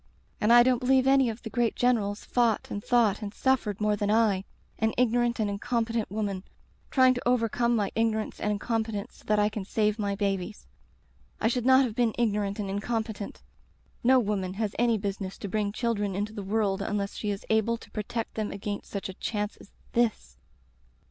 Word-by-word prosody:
'And 210 - +3
I 240 0 +9
don't 250 -1 +3
believe 260 +1 +3
any 270 -2 +4
of 225 +1 -7
the 225 - -5
great 235 +1 +1
generals 220 -4 +1
fought 235 -3 +1
and 205 - -4
thought 235 -5 +2
and 205 -1 -4
suffered 245 -7 +1
more 210 0 +2
than 205 0 -1
I 210 -3 +3 0.2
— - - -34
an 220 0 +1
ignorant 240 0 +2
and 215 - +1
incompetent 225 +2 -1
woman 200 -2 -3 0.2
— - - -36
trying 255 -1 +5
to 245 -1 -4
overcome 240 0 +2
my 205 -3 0
ignorance 220 -1 -1
and 210 - 0
incompetence 220 -1 -3
so - - -19
that 210 - +2
I 210 0 +4
can 210 -1 -4
save 210 +2 0
my 200 -1 -1
babies.... 195 0 -2 0.7
I - - +2
should 245 0 -1
not 260 +1 +6
have 230 - -4
been 235 -1 +1
igno 210 -4 +1
ant 195 - -5
and 205 -2 -3
incompetent. 215 +1 -3 0.6
No 260 +2 +6
woman 200 -5 -1
has 210 -1 -2
any 235 -2 +3
business 195 -1 -4
to - - -6
bring 205 +1 -1
children 210 -4 -1
into 205 +2 -2
the 210 - -5
world 200 -1 0
unless 200 -1 -2
she 210 - -3
is 200 -1 -4
able 220 +1 +2
to - - -16
protect 225 +2 -4
them 215 -1 -2
against 205 +1 -5
such 200 - -4
a 190 - -7
chance 210 +2 -3
as - - -16 0.2
this. 210 - 0
215 Hz, 200 wpm, -28 LUFS, 205-235 Hz, 0.7 s, I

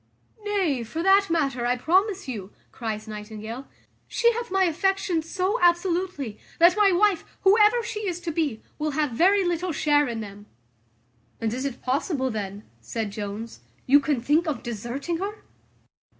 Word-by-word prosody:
"Nay, 375 - 0
for 320 +9 -4
that 390 +1 +5
matter, 275 -7 0
I 250 +1 +1
promise 375 - +1
you," 210 -6 -6 0.2
cries 220 -2 -5
Nightingale, 215 +4 -7 0.4
"she 470 0 +3
hath 475 +1 -4
my 385 0 +2
affections 355 -1 0
so 390 +5 0
absolutely, 345 - +1 0.2
that 345 +1 +6
my 415 -2 +5
wife, 375 -1 +3 0.2
whoever 425 +4 +5
she 425 -2 -4
is 355 -2 -2
to 340 -1 -3
be, 300 -8 -2 0.2
will 305 0 -1
have 300 -4 +1
very 375 +10 +3
little 350 +1 -1
share 295 -1 +2
in 235 -2 -3
them." 205 -1 -9 0.9
"And 225 -1 -1
is 260 +2 -3
it 275 -3 -5
possible 265 0 0
then," 205 -1 -5 0.2
said 205 - -4
Jones, 210 +2 -6 0.3
"you 280 +3 +6
can 285 -2 0
think 300 +7 +2
of 285 -6 -2
deserting 240 - -4
her?" 405 +4 -5
310 Hz, 160 wpm, -25 LUFS, 235-375 Hz, 0.9 s, that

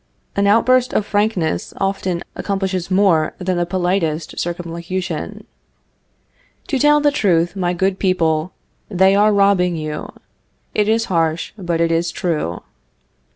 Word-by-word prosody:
An 200 0 +2
outburst 255 +4 +3
of 210 - +1
frankness 205 -7 -1
often 190 -3 -2
accomplishes 190 -3 -2
more 185 -5 +2
than 185 0 -2
the 175 0 0
politest 175 -3 -1
circumlocution. 175 +1 -4 1.2
To 270 - 0
tell 295 +2 +5
the 295 0 +3
truth, 175 - +1
my 180 -2 0
good 190 +2 0
people, 170 -3 +1 0.4
they 190 -1 +4
are 210 +1 +4
robbing 195 -3 +3
you. 155 -1 -5 0.6
It 210 0 +1
is 225 +1 +2
harsh, 165 -2 -1
but 175 -5 -2
it 165 0 +2
is 165 +1 +1
true. 155 - -3
185 Hz, 130 wpm, -19 LUFS, 170-200 Hz, 1.2 s, tell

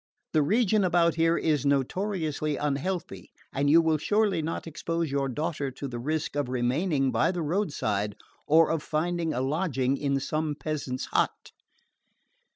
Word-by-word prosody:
The 155 - +4
region 215 +5 +3
about 170 -2 +3
here 165 +1 +2
is 150 -4 +1
notoriously 155 +1 0
unhealthy 145 - -3 0.2
and 140 +1 +1
you 165 +3 +7
will 160 -1 +2
surely 205 +1 +1
not 160 +2 -4
expose 165 -1 -3
your 140 -1 0
daughter 145 +1 -2
to 135 +2 -6
the 120 -2 -5
risk 155 +4 -2
of 145 -3 -1
remaining 135 +3 +1
by 115 +8 +2
the 175 -3 -3
roadside 140 - -1 0.3
or 160 +1 +5
of 165 -2 0
finding 165 +2 -1
a 125 - -1
lodging 135 -2 0
in 140 -1 0
some 155 +2 -2
peasant's 140 -3 -3
hut." - - 0
155 Hz, 155 wpm, -27 LUFS, 135-170 Hz, 0.3 s, you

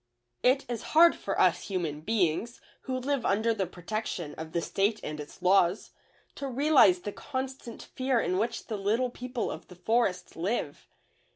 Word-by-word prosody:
It 260 +2 +3
is 235 -2 -3 0.2
hard 340 +1 +8
for - - -3
us - - +3
human 165 -6 -3
beings, 210 +3 0 0.3
who 260 -1 -2
live 265 0 -1
under 220 +3 +2
the 195 -4 -2
protection 180 -3 -4
of 160 0 -8
the 170 - 0
State 200 +5 0
and 150 0 -5
its 150 +4 -10
laws, 180 +1 +3 0.4
to 280 - -5
realize 265 - +5
the 205 - -4
constant 260 -1 -6
fear 260 -2 0
in 185 -3 0
which 230 +2 -2
the 215 - -4
Little 225 +6 0
People 250 0 -4
of - - -8
the 180 - -13
Forest 200 0 0
live. 175 -4 -3
220 Hz, 170 wpm, -29 LUFS, 180-250 Hz, 0.4 s, hard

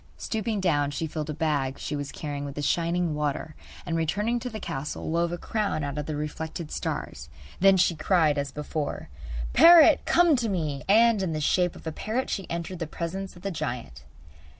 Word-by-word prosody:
Stooping 220 -1 -2
down 145 -6 +2
she 145 +3 -3
filled 155 -1 -4
a - - -2
bag 145 -4 0
she 150 - -4
was 145 -1 -4
carrying 145 -2 -5
with 140 -1 -6
the 145 - -4
shining 170 +1 +1
water 150 +1 -2 0.3
and, 165 - -2
returning 205 +9 0
to 250 - -5
the 220 -2 -6
castle, 150 -2 -4
wove 170 +1 +1
a 175 - -3
crown 205 -4 -2
out 145 +1 -3
of 150 - -4
the 155 - -3
reflected 155 +2 -5
stars. 65 +1 -4 0.3
Then 195 0 +6
she 180 -1 +3
cried 155 -3 +2
as 140 -1 -3
before: 150 +1 -4 0.4
'Parrot, 335 -1 +8
come 345 -3 +5
to 235 -2 -1
me!' 155 -7 -2
And 225 0 +5
in 180 -4 -1
the 155 - -2
shape 175 +4 +1
of - - -13
a 160 - -2
parrot 225 +10 -3
she 195 - -3
entered 170 +1 -4
the 165 - -3
presence 185 +5 -5
of 175 - -15
the 200 - -2
giant. 120 - -5
165 Hz, 200 wpm, -26 LUFS, 150-195 Hz, 0.4 s, Parrot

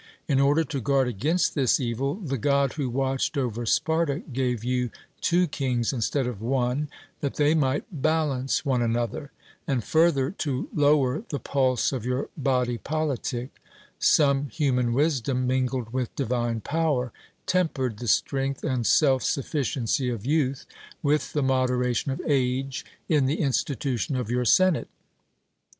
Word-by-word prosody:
In 135 -3 +2
order 145 +4 +4
to 155 -3 -4
guard 135 +1 +2
against 145 - 0
this 135 -5 +2
evil, 130 +3 -1
the 145 - -4
God 140 +2 +2
who 140 -5 -2
watched 135 +3 -1
over 120 -3 -2
Sparta 160 +2 +1
gave 125 -3 -1
you 125 0 0 0.3
two 180 +1 +3
kings 130 -6 -1
instead 130 +2 0
of 120 -5 -5
one, 130 +4 0 0.3
that 140 - -3
they 150 +1 +3
might 145 -3 +1 0.2
balance 150 -4 0
one 130 -3 +1
another; 120 +4 -1 0.4
and 130 -5 0
further 155 -2 +2
to 145 -9 -3
lower 145 - +3
the 145 - -2
pulse 130 -1 +1
of 130 -5 -3
your 125 +2 -2
body 125 -4 0
politic, 140 -5 -2 0.5
some 140 -2 +3
human 125 -5 0
wisdom, 130 -3 +1
mingled 125 -2 -1
with 125 -2 -2
divine 120 -3 -1
power, 145 -5 0 0.3
tempered 155 - 0
the 120 - -5
strength 135 +5 0
and 125 -3 0
self 135 -4 +4
sufficiency 135 -3 -1
of 115 -3 -4
youth 140 -2 0 0.4
with 150 +1 +1
the 145 - +1
moderation 125 -1 +1
of 135 - -4
age 135 -1 0 0.2
in 150 -5 +3
the 145 +4 -1
institution 135 -2 -1
of 125 -3 -2
your 125 0 0
senate. 185 +5 +4
135 Hz, 145 wpm, -26 LUFS, 125-145 Hz, 0.5 s, order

